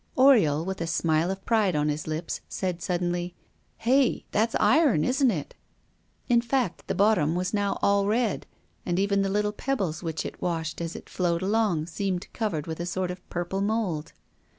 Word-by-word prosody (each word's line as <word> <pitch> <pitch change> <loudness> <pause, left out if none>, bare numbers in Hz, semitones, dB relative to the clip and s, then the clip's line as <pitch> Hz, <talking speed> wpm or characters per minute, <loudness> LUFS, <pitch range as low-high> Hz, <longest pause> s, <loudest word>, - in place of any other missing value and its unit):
Oriol, 205 - +5
with 190 -2 -4
a 165 - -1
smile 165 0 +1
of 195 0 -5
pride 215 -7 +2
on 150 0 +1
his 150 +1 -2
lips, 155 +2 -3
said 180 -2 -3
suddenly: 175 0 -2 0.4
"Hey, 260 +2 +2
that's 225 +2 +1
iron, 275 - +4
isn't 265 - +3
it?" 160 -10 -3 0.7
In 240 -2 +4
fact 240 -5 -1
the - - -1
bottom 195 -5 +3
was 180 +2 -1
now 200 -1 0
all 200 0 +3
red, 225 0 0 0.4
and 175 -1 -1
even 200 +1 +2
the 195 - 0
little 210 +1 +1
pebbles 200 -11 -2
which 160 -3 -3
it - - -7
washed 165 -1 -2
as 165 0 -4
it - - -9
flowed 175 -1 -1
along 200 -6 +1
seemed 185 +1 -3
covered 175 -10 -2
with 160 -1 -5
a 170 - -2
sort 180 +1 -2
of 180 0 -11
purple 175 +2 -2
mold. 200 -7 -1
185 Hz, 180 wpm, -26 LUFS, 165-215 Hz, 0.7 s, Oriol